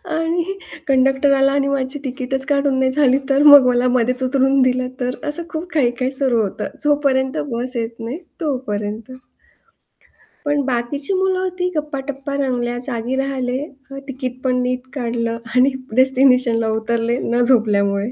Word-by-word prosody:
आणि 340 Hz, +4 st, -1 dB, 0.3 s
कंडक्टर 270 Hz, +1 st, +3 dB
आला 270 Hz, 0 st, +3 dB
आणि 280 Hz, 0 st, +1 dB
माझी 275 Hz, 0 st, -2 dB
तिकीटच 265 Hz, +1 st, 0 dB
काढून 280 Hz, -2 st, +1 dB
नाही 260 Hz, 0 st, +2 dB
झाली 270 Hz, -2 st, +3 dB
तर? 275 Hz, +1 st, +3 dB
मग 285 Hz, -3 st, +9 dB
मला 245 Hz, 0 st, +2 dB
मध्येच 250 Hz, +2 st, +1 dB
उतरून 270 Hz, +1 st, +2 dB
दिलं 255 Hz, 0 st, +1 dB
तर? 250 Hz, 0 st, -2 dB
असं 320 Hz, +3 st, -3 dB
खूप 325 Hz, +3 st, -5 dB
काही-काही 255 Hz, -2 st, 0 dB
सुरू 265 Hz, -4 st, +3 dB
होतं." 200 Hz, -3 st, -3 dB, 0.2 s
जोपर्यंत 275 Hz, -3 st, +1 dB
बस 250 Hz, +2 st, -2 dB
येत 230 Hz, 0 st, -4 dB
नाही 240 Hz, +7 st, -5 dB, 0.2 s
तोपर्यंत. 220 Hz, -6 st, -4 dB, 1.3 s
पण 290 Hz, 0 st, +1 dB
बाकीची 270 Hz, +6 st, -1 dB
मुलं 375 Hz, 0 st, +1 dB
होती 365 Hz, -1 st, -2 dB
गप्पाटप्पा 280 Hz, -2 st, -4 dB
रंगल्या, 245 Hz, -2 st, -2 dB
जागी 240 Hz, +1 st, -3 dB
राहिले, 260 Hz, -2 st, -2 dB, 0.3 s
अ, 275 Hz, -, -7 dB
तिकीट 255 Hz, -2 st, -6 dB
पण 250 Hz, -1 st, +1 dB
नीट 250 Hz, +1 st, -3 dB
काढलं 230 Hz, -3 st, -2 dB, 0.2 s
आणि 255 Hz, +2 st, +4 dB, 0.2 s
डेस्टिनेशनला 255 Hz, -3 st, +3 dB
उतरले 235 Hz, +1 st, -1 dB, 0.2 s
न 240 Hz, -, +2 dB
झोपल्यामुळे. 210 Hz, -3 st, +2 dB
260 Hz, 145 wpm, -19 LUFS, 245-280 Hz, 1.3 s, मग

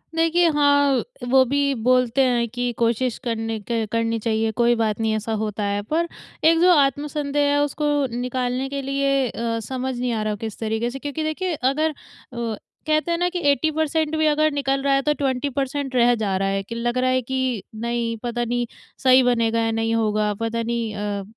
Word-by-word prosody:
देखिए 330 Hz, +1 st, +3 dB
हाँ, 285 Hz, -2 st, +3 dB, 0.3 s
वो 260 Hz, +1 st, +6 dB
भी 280 Hz, +2 st, +1 dB
बोलते 250 Hz, +1 st, +3 dB
हैं 240 Hz, -2 st, +1 dB
कि 245 Hz, +1 st, -2 dB
कोशिश 235 Hz, +1 st, 0 dB
करने 225 Hz, -2 st, -2 dB
क 230 Hz, -2 st, 0 dB
करनी 230 Hz, 0 st, 0 dB
चाहिए, 220 Hz, 0 st, 0 dB
कोई 240 Hz, +2 st, +2 dB
बात 220 Hz, -2 st, 0 dB
नहीं 220 Hz, -1 st, +1 dB
ऐसा 220 Hz, +1 st, -3 dB
होता 210 Hz, -1 st, -3 dB
है 205 Hz, 0 st, -1 dB
पर 335 Hz, +2 st, +1 dB, 0.4 s
एक 325 Hz, +1 st, +5 dB
जो 360 Hz, +1 st, +6 dB
आत्मसंदेह 290 Hz, -1 st, +1 dB
है 290 Hz, -, +2 dB
उसको 295 Hz, +1 st, -2 dB, 0.3 s
निकालने 250 Hz, +1 st, -2 dB
के 280 Hz, 0 st, -3 dB
लिए 275 Hz, -1 st, 0 dB
अ, 230 Hz, 0 st, -2 dB
समझ 255 Hz, +3 st, -4 dB
नहीं 250 Hz, 0 st, -1 dB
आ 220 Hz, -, -1 dB
रहा 215 Hz, 0 st, -1 dB
किस 220 Hz, -2 st, -5 dB
तरीके 220 Hz, +1 st, -1 dB
से 270 Hz, -, -7 dB
क्योंकि 290 Hz, +3 st, -4 dB
देखिए 335 Hz, +4 st, -2 dB
अगर 280 Hz, +4 st, +1 dB
अ, -, -, -6 dB, 0.9 s
कहते 310 Hz, +2 st, +1 dB
हैं 335 Hz, -, +1 dB
न 355 Hz, -, +2 dB
कि 360 Hz, 0 st, -3 dB
80% 315 Hz, +1 st, 0 dB
भी 315 Hz, -, +2 dB
अगर 305 Hz, +1 st, +3 dB
निकल 275 Hz, -1 st, 0 dB
रहा 280 Hz, 0 st, +2 dB
है 275 Hz, -, +3 dB
तो 300 Hz, -, +4 dB
20% 275 Hz, 0 st, -2 dB
रह 245 Hz, 0 st, +5 dB
जा 210 Hz, -4 st, -1 dB
रहा 195 Hz, -, 0 dB
है 195 Hz, 0 st, -1 dB
कि 230 Hz, +4 st, -7 dB
लग 240 Hz, +1 st, -1 dB
रहा 255 Hz, 0 st, +2 dB
है 255 Hz, 0 st, +2 dB
कि 260 Hz, -3 st, -2 dB, 0.2 s
नहीं 235 Hz, -1 st, -1 dB
पता 240 Hz, 0 st, -2 dB
नहीं 240 Hz, +1 st, -1 dB, 0.4 s
सही 260 Hz, 0 st, +6 dB
बनेगा 230 Hz, -2 st, +2 dB
या 225 Hz, 0 st, 0 dB
नहीं 225 Hz, 0 st, 0 dB
होगा 215 Hz, -1 st, +1 dB
पता 230 Hz, 0 st, -1 dB
नहीं 230 Hz, -2 st, -2 dB
अ, 205 Hz, -1 st, -3 dB
250 Hz, 200 wpm, -22 LUFS, 230-285 Hz, 0.9 s, वो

